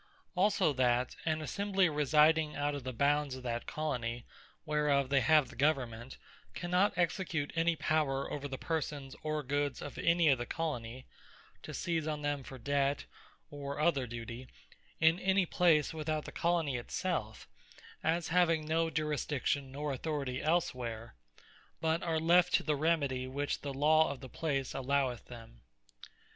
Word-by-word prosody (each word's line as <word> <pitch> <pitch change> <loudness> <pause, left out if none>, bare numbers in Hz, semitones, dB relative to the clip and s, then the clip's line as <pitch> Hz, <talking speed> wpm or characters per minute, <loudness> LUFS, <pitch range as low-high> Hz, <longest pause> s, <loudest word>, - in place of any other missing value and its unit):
Also 185 -4 +2
that 125 -1 +1
an 155 -1 0
Assembly 195 +2 +1
residing 150 +1 +3
out 145 0 0
of 140 -2 -5
the 130 - -3
bounds 140 +2 +1
of 130 - -9
that 120 -1 -3
Colony 120 -6 -3 0.4
whereof 150 -3 +1
they 140 -1 +3
have 155 -2 +4
the - - -12
government, 130 -4 -1 0.4
cannot 180 +3 +2
execute 175 -4 -1
any 165 0 +2
power 150 -4 0
over 145 -1 -4
the 135 -1 -5
persons, 150 -4 -3
or 155 -1 -2
goods 145 0 -1
of 145 - -7
any 170 0 +3
of 135 -3 +3
the 120 - -3
Colonie, 130 -6 -4 0.6
to - - -8
seize 165 -3 -2
on 150 -1 -3
them 145 -1 -1
for 130 0 -9
debt, 140 +2 0 0.5
or 140 0 -5
other 140 -5 +2
duty, 120 +2 -7 0.5
in 160 +2 +4
any 190 -1 +2
place 165 -4 +3
without 155 -1 -2
the - - -7
Colony 165 -6 0
it 120 - -8
selfe, 120 -13 -3 0.6
as 165 +1 0
having 165 -2 +3
no 165 +1 +1
Jurisdiction, 150 -3 -1
nor 145 +1 -3
Authoritie 135 -2 -3
elsewhere, 125 -9 -1 0.7
but 160 +1 +1
are 165 -2 0
left 170 +2 +4
to - - +2
the 155 - +1
remedie, 140 -4 0
which 140 +2 -2
the 140 - -4
Law 155 +3 +4
of 140 - -5
the 130 - -10
place 140 -4 -2
alloweth 135 -2 0
them. 115 - -12
145 Hz, 155 wpm, -33 LUFS, 130-160 Hz, 0.7 s, have